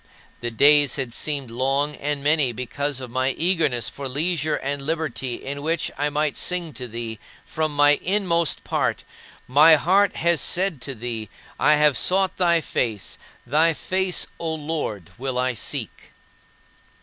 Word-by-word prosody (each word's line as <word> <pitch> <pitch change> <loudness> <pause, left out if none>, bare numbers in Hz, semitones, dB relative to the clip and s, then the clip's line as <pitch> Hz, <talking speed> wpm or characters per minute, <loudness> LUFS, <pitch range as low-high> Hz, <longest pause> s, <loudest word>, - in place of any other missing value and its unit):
The 120 - -3
days 145 +3 +5
had 130 -5 -4
seemed 140 -3 -2
long 135 +4 0
and 145 -1 -3
many 145 -3 +3
because 130 +4 -3
of 125 -2 -7
my 130 +1 0
eagerness 155 - +1
for 140 -1 -6
leisure 155 +2 0
and 140 0 -3
liberty 135 -5 -3
in 140 +1 -6
which 160 +2 -1
I 145 +1 -1
might 150 0 -1
sing 175 -4 -1
to 125 -1 -6
thee 115 -1 -6 0.3
from 155 -2 -2
my 145 0 +5
inmost 175 -4 0
part, - - -1 0.4
"My 150 +5 +7
heart 190 +7 +2
has 170 -1 +2
said 180 -6 +1
to 135 - -4
thee, 115 -2 -5 0.3
I 150 - +5
have 150 -2 +4
sought 190 +7 +2
thy 170 -2 +3
face; 110 -8 -3 0.3
thy 155 +6 +3
face, 185 +1 -1
O 160 -1 -2
Lord, 145 - -4
will 130 -1 -3
I 130 0 0
seek." 115 - -5
145 Hz, 155 wpm, -23 LUFS, 130-160 Hz, 0.4 s, My